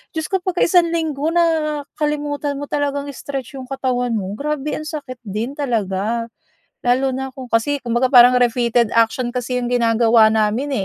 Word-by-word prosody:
Diyos 315 -1 -2
ko, 380 - +2
'pagka 365 -2 0
isang 345 -1 +4
linggo 315 -3 -1
nakalimutan 300 -3 -1
mo 290 - -4
talagang 285 -1 -1
i-stretch 275 -1 -6
'yong 255 -1 -9
katawan 250 -2 -1
mo, 195 -2 -3
grabe 300 0 -2
ang 310 - -6
sakit 280 -5 -7
din 220 +5 -4
talaga. 230 -3 -1 0.6
Lalo 255 +2 +2
na 265 0 -4
kung 260 -1 -8
kasi 280 +6 +1
kumbaga 240 +2 +1
parang 250 0 +8
repeated 235 -1 +2
action 230 +2 +2
kasi 250 0 -2
'yong 245 - -3
ginagawa 230 -2 +4
namin, 220 +6 0
260 Hz, 160 wpm, -19 LUFS, 235-290 Hz, 0.6 s, parang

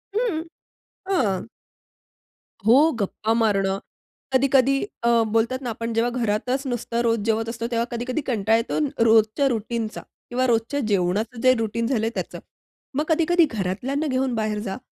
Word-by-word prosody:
हं, 430 -9 0 0.7
हां. 215 - 0 1.2
हो, 285 +8 +6
गप्पा 215 +2 -1
मारणं. 195 -4 +1 0.5
कधी-कधी 270 0 +4 0.3
अ, 235 - +3 0.2
बोलतात 235 +4 +1
ना 250 - -4
आपण 230 +1 -4
जेव्हा 230 +2 +1
घरातच 250 +6 -1
नुसतं 240 -1 -2
रोज 230 -1 +2
जेवत 225 0 0
असतो. 230 0 -4
तेव्हा 230 0 +1
कधी-कधी 245 +5 -2
कंटाळा 220 -1 +2
येतो 230 - -2 0.2
रोजच्या 220 +4 +4
रूटीनचा 230 -2 -3 0.3
किंवा 255 +1 0
रोजच्या 235 +4 +1
जेवणाचं 205 +5 0
जे 255 0 +6
रुटीन 225 +1 -1
झालंय 225 -3 0
त्याचं. - - -4 0.6
मग 295 - +1
कधी-कधी 335 +1 +4
घरातल्यांना 225 +10 -2
घेऊन 260 -1 0
बाहेर 215 -1 -1
जा. 190 - -4
230 Hz, 140 wpm, -23 LUFS, 220-260 Hz, 1.2 s, हो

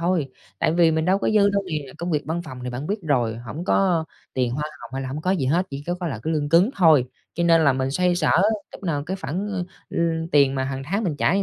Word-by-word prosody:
thôi, 170 -6 0 0.3
tại 155 - +2
vì 170 -1 +4
mình 160 0 0
đâu 190 +2 +3
có - - -1
dư 205 -2 +4
đâu 200 0 0
nè. 150 -4 -4
Công 175 +1 -3
việc 150 -2 +1
văn 170 +2 -2
phòng 130 - -9
thì 125 - -3
bạn 130 +5 -5
biết 205 +2 -1
rồi, 120 -8 +1
hổng 120 +8 -7
có 180 -4 +2 0.3
tiền 125 -2 +1
hoa 150 +4 -2 0.2
hồng 120 - -10
hay 135 - -2
là 130 - -4
hổng 140 +4 -4
có 180 +4 0
gì 165 -9 +1
hết, 175 +7 +2
chỉ 140 0 -6
có 175 - 0
có 175 - -2
là 135 -8 -3
cái 160 - -1
lương 150 -2 0
cứng 175 +8 +5
thôi. 160 -8 +5 0.3
Cho 170 - 0
nên 165 -1 +5
là 140 - +5
mình 130 0 -1
xoay 180 +5 +2
sở 175 -3 +1 0.4
lúc - - -11
nào 155 -6 -1
cái 190 +2 -2
khoản, 195 +6 -3
ơ, 190 -3 -2 0.3
ưm, 165 -1 -1
tiền 140 -2 +5
mà 130 - -1
hằng 135 0 -4
tháng 200 +6 -1
mình 155 -5 -1
trả 165 - +2
như 200 - +2
160 Hz, 290 wpm, -23 LUFS, 140-180 Hz, 0.4 s, cứng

